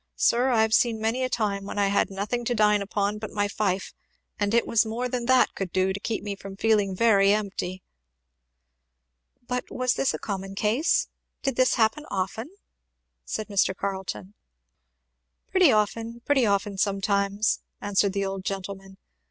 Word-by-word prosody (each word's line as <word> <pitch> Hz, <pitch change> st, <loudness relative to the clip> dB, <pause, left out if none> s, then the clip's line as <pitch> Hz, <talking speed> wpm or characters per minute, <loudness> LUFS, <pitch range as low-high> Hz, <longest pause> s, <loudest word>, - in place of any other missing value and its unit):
Sir, 245 Hz, +3 st, +3 dB
I 225 Hz, -3 st, +4 dB
have 220 Hz, 0 st, 0 dB
seen 230 Hz, -1 st, +3 dB
many 225 Hz, +4 st, 0 dB
a 255 Hz, -, 0 dB
time 200 Hz, -5 st, -1 dB
when 200 Hz, -, -6 dB
I 200 Hz, -1 st, +2 dB
had 200 Hz, -, +2 dB
nothing 205 Hz, +5 st, -3 dB
to 240 Hz, -, 0 dB
dine 210 Hz, -1 st, +3 dB
upon 205 Hz, +1 st, -1 dB
but 215 Hz, -1 st, -6 dB
my 205 Hz, -1 st, 0 dB
fife, 200 Hz, -2 st, -2 dB, 0.5 s
and 205 Hz, -1 st, +1 dB
it 235 Hz, +1 st, +3 dB
was 230 Hz, 0 st, +3 dB
more 230 Hz, +3 st, -3 dB
than 245 Hz, -1 st, -3 dB
that 260 Hz, -1 st, +4 dB
could 190 Hz, -3 st, -4 dB
do 190 Hz, +1 st, +1 dB
to 200 Hz, -, -5 dB
keep 220 Hz, 0 st, -3 dB
me 205 Hz, -1 st, -4 dB
from 195 Hz, 0 st, -10 dB
feeling 205 Hz, -3 st, +2 dB
very 200 Hz, -2 st, +4 dB
empty!" 195 Hz, -3 st, -2 dB, 1.6 s
"But 250 Hz, 0 st, -3 dB
was 255 Hz, -1 st, 0 dB
this 270 Hz, -, +1 dB
a -, -, -3 dB
common 195 Hz, -1 st, -5 dB
case? 220 Hz, -, +1 dB, 0.4 s
did 270 Hz, -3 st, 0 dB
this 255 Hz, 0 st, +3 dB
happen 235 Hz, +7 st, +1 dB
often?" 200 Hz, +7 st, -3 dB, 0.8 s
said 215 Hz, -, -4 dB
Mr. 195 Hz, -2 st, +1 dB
Carleton. 190 Hz, 0 st, -4 dB, 1.2 s
"Pretty 370 Hz, -6 st, +5 dB
often 225 Hz, +2 st, -1 dB
pretty 270 Hz, -5 st, +3 dB
often, 200 Hz, -1 st, 0 dB
sometimes," 200 Hz, +1 st, +1 dB, 0.2 s
answered 200 Hz, -1 st, +1 dB
the 200 Hz, -1 st, -1 dB
old 195 Hz, -1 st, -4 dB
gentleman. 195 Hz, 0 st, -6 dB
205 Hz, 170 wpm, -26 LUFS, 195-230 Hz, 1.6 s, Pretty